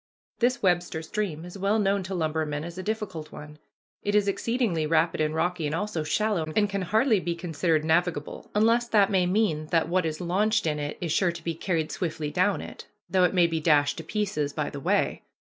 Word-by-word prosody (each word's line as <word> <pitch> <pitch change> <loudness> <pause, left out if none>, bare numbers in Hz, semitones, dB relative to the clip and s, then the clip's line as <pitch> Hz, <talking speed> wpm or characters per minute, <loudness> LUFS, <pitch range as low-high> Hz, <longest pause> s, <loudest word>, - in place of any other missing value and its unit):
This 250 0 +1
Webster 175 -3 +1
Stream 170 -3 -3
is 180 +2 -9
well 200 +3 +2
known 200 -1 +2
to 190 +1 -5
lumbermen 155 -3 -1
as 170 +1 -7
a 185 - -5
difficult 190 -7 -4
one. 150 0 -10 0.4
It 205 0 -1
is 205 -1 +3
exceedingly 200 -6 0
rapid 165 0 +2
and 155 0 0
rocky, 170 -1 0
and 150 - -2
also 185 -3 -2
shallow, 175 -2 0
and 210 -1 +3
can 200 -1 -3
hardly 215 +4 +2
be 170 -1 -2
considered 165 -2 0
navigable, 160 -2 0
unless 230 +3 +3
that 210 -4 +3
may 185 -2 +3
mean 180 -6 +1
that 165 0 +1
what 180 -1 +1
is 155 -1 -4
launched 205 +4 +1
in 150 -2 0
it 145 0 -4
is 170 -3 -2
sure 175 +2 +2
to 170 -1 -10
be 165 - -2
carried 165 -1 -2
swiftly 160 -4 -3
down 185 +5 +1
it, - - -10 0.2
though 185 -1 +4
it 180 - 0
may 175 -2 +5
be 165 -1 -1
dashed 145 -2 +3
to - - -6
pieces 160 -6 -2
by 150 -2 -2
the 145 - -6
way. - - 0
175 Hz, 215 wpm, -26 LUFS, 155-200 Hz, 0.4 s, may